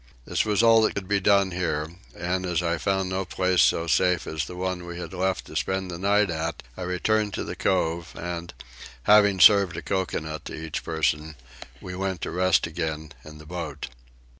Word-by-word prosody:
This - - 0
was 105 +1 +2
all 115 -1 +6
that 110 - +1
could 100 -2 -4
be 100 0 +2
done 100 -1 +3
here 80 -3 -2 0.2
and, 90 +2 -2
as 90 -1 -1
I 85 -1 0
found 95 0 0
no 95 +1 -1
place 90 -2 +1
so 80 +3 +3
safe 85 +1 +2
as 80 -1 -3
the 90 - -9
one 90 -1 -3
we 85 0 -6
had 90 - -7
left 95 0 -1
to - - -12
spend 95 -1 -1
the 85 - -6
night 100 0 +2
at, 80 -1 -3
I - - -9
returned 105 +4 0
to - - -3
the - - -6
cove 85 -2 0
and, 85 0 -5 0.5
having 100 -2 +5
served 95 0 +6
a - - -5
coconut 80 -5 -3
to - - -6
each 80 -1 -5
person, 80 -1 -1 0.5
we 90 - -7
went 95 -1 -3
to - - -3
rest 95 0 +2
again 80 -1 -4
in 75 0 -11
the 75 - -13
boat. 75 -5 -6
90 Hz, 200 wpm, -25 LUFS, 80-95 Hz, 0.5 s, all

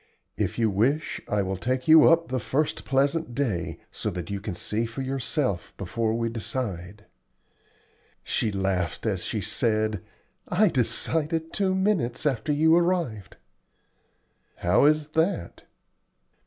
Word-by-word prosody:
If - - -2
you 115 -2 +2
wish 130 +11 0
I 105 -1 +1
will 95 0 -3
take 130 +5 -2
you 160 -1 +8
up 165 -2 +3
the 130 0 -1
first 145 +6 -1
pleasant 140 0 +1
day, 115 - -2
so - - -3
that 90 +1 -5
you 100 -1 -3
can 100 -3 -5
see 110 +6 -2
for 115 +4 -5
yourself 130 - -2
before 115 -1 -1
we 115 0 0
decide." 105 -4 -5 1.2
She 110 - 0
laughed 95 -3 -1
as - - -1
she - - -2
said, 110 -3 0 0.5
"I 200 +3 +3
decided 160 +5 0
two 190 -2 +1
minutes 190 - 0
after 135 -1 0
you 160 +3 +4
arrived." 170 - 0 1.2
"How 90 +10 +3
is 155 0 +3
that?" 160 - -1
125 Hz, 135 wpm, -26 LUFS, 105-155 Hz, 1.2 s, you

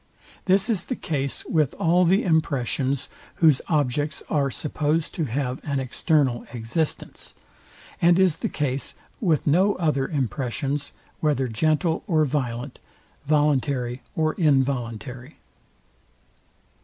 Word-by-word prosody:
This 195 +2 +4
is 210 -6 0
the 255 - -3
case 140 - -3
with 155 -5 +1
all 175 +2 +3
the 190 +4 +3
impressions, 140 -5 0 0.3
whose 155 -6 +4
objects 145 -1 0
are 140 -3 +2
supposed 155 +3 -1
to 165 - -1
have 130 +1 -2
an 140 -2 -1
external 130 -1 +1
existence; 125 +7 -3 0.7
and 170 0 +5
is 185 -4 +3
the - - -2
case 140 -2 -2 0.2
with 165 - +1
no 185 +7 +3
other 150 -6 0
impressions, 140 +1 -2 0.3
whether 145 -4 +1
gentle 155 +7 +1
or 155 -5 +3
violent, 125 -2 -3 0.5
voluntary 140 -4 +1
or 155 -1 +1
involuntary. 130 - -1
145 Hz, 115 wpm, -24 LUFS, 130-160 Hz, 0.7 s, and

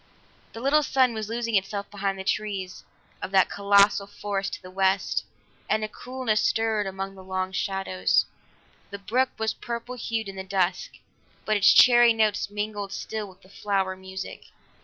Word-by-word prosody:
The 225 - -8
little 285 +4 +4
sun 260 -4 +2
was 220 -1 -5
losing 230 0 -3
itself 200 +1 -1
behind 195 -1 -2
the 190 - -5
trees 195 -2 -3 0.4
of - - -4
that 190 -1 +3
colossal 200 0 +4
forest 200 -1 -3
to - - -6
the 185 - -11
west, 190 +1 +1 0.5
and 215 - +1
a - - -1
coolness 250 -1 -2
stirred 220 -2 +1
among 195 0 -5
long 185 0 -4
shadows. 190 - 0 0.6
The 200 - -6
brook 235 +7 0
was 220 0 -1
purple 235 +1 -6
hued 225 -3 -3
in 195 -1 -8
the 190 - -4
dusk, 185 -1 -1 0.5
but 215 - +1
its 200 -1 +6
cheery 240 -1 +7
notes 215 -2 +1
mingled 205 -1 -4
still 215 0 -5
with 185 0 -19
the 185 - -19
flower 195 -2 -1
music. 190 0 -8
200 Hz, 165 wpm, -26 LUFS, 190-220 Hz, 0.6 s, cheery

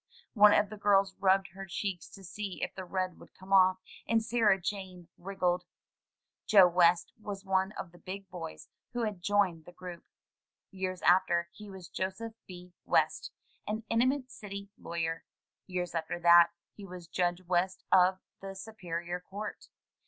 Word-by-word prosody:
One 210 -2 +7
of 205 -1 +3
the 215 - -7
girls 200 -1 +3
rubbed 190 -1 +3
her 195 +3 -9
cheeks 190 -1 -4
to 195 - -12
see 195 +1 -5
if - - -3
the 185 - -7
red 185 -1 -3
would - - -16
come 190 +1 -6
off, 185 -1 +6 0.3
and 225 -1 +2
Sarah 220 -4 +3
Jane 185 -2 -5
wriggled. 180 -1 -1 0.8
Joe 195 -4 +8
West 175 0 +3
was 200 -2 -6
one 190 0 +1
of 175 - -7
the 175 - -17
big 195 +1 -7
boys 170 -3 -8 0.3
who 240 -1 -1
had 210 -5 -3
joined 190 -5 +1
the - - -12
group. 175 -1 -9 0.7
Years 185 -1 -4
after, 175 -1 +3
he 210 -1 -11
was 190 -3 -10
Joseph 190 +5 -4
B. 180 -1 -11
West, - - +1 0.4
an 215 +2 -2
eminent 255 +3 +1
city 200 -2 -8
lawyer. 165 -1 -3 0.4
Years 180 -2 -3
after 165 +1 -3
that, 170 0 +8 0.3
he 205 - -12
was 180 -3 -9
Judge 175 +1 -1
West 185 +2 0
of 185 0 +5 0.2
the 195 0 -7
Superior 180 -4 -5
Court. 200 +4 -7
190 Hz, 160 wpm, -31 LUFS, 175-200 Hz, 0.8 s, Joe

